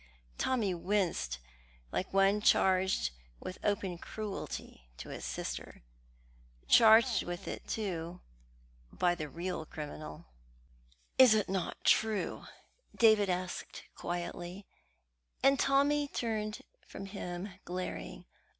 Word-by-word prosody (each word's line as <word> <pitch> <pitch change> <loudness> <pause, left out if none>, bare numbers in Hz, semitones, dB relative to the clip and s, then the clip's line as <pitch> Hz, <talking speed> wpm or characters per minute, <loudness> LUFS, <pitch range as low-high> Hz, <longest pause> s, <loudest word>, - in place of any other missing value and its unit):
Tommy 225 -8 +1
winced 175 - 0 0.5
like 190 - -2
one 195 +2 +4
charged 190 - +3 0.3
with 185 - -7
open 190 -4 0
cruelty 200 - -6
to - - -8
his - - -6
sister - - -5 0.8
charged 225 - +7
with 175 0 -6
it, - - -6
too, 180 -5 -3 0.7
by 175 -1 +2
the 155 -4 -5
real 170 +3 -3
criminal. 75 - -8 0.9
"It 255 -4 +9
is 210 - +1
not 190 -2 -3
true?" 220 -2 +2 0.5
David 220 -3 +5
asked 180 0 -3
quietly, 175 +2 -5 0.8
and 275 0 +5
Tommy 285 +1 +3
turned 215 -5 -3 0.2
from 195 - -7
him 190 -1 -5
glaring. 180 +1 -5
190 Hz, 105 wpm, -32 LUFS, 175-215 Hz, 0.9 s, It